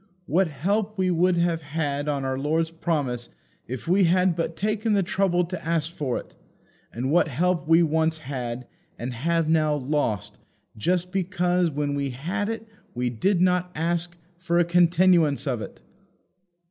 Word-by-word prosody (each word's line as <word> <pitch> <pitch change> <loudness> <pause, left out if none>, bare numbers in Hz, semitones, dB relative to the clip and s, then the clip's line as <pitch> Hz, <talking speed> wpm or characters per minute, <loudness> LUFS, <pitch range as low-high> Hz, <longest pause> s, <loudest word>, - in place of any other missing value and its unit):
What 180 +3 +2
help 200 +9 -1
we 185 -1 +2
would 175 +1 +2
have 170 -1 +1
had 145 -1 -2
on 140 -2 -1
our 130 0 -1
Lord's 160 +3 0
promise 145 -8 -2 0.4
if 130 +4 -6
we 185 +2 +4
had 180 +1 +3
but 165 -1 -2
taken 215 +3 0
the 200 -1 +3
trouble 180 -1 +1
to 180 +1 -6
ask 165 0 -1
for 135 -7 -2
it! - - -9 0.6
And 130 +4 -2
what 170 -1 +4
help 170 +4 0
we 165 +1 +6
once 160 0 +1
had, 125 -4 -5 0.3
and 125 +2 -4
have 165 +6 0
now 155 -2 +3
lost, 135 -7 -2 0.4
just 180 - 0
because 180 -2 +1
when 145 -1 -2
we 140 -1 -1
had 180 - -3
it 225 0 -5 0.3
we 125 0 -1
did 175 - +1
not 180 0 +2
ask 170 +2 -1 0.2
for 175 -1 0
a 175 - +4
continuance 170 -4 +3
of 125 -5 -1
it! - - -9
165 Hz, 165 wpm, -25 LUFS, 145-180 Hz, 0.6 s, we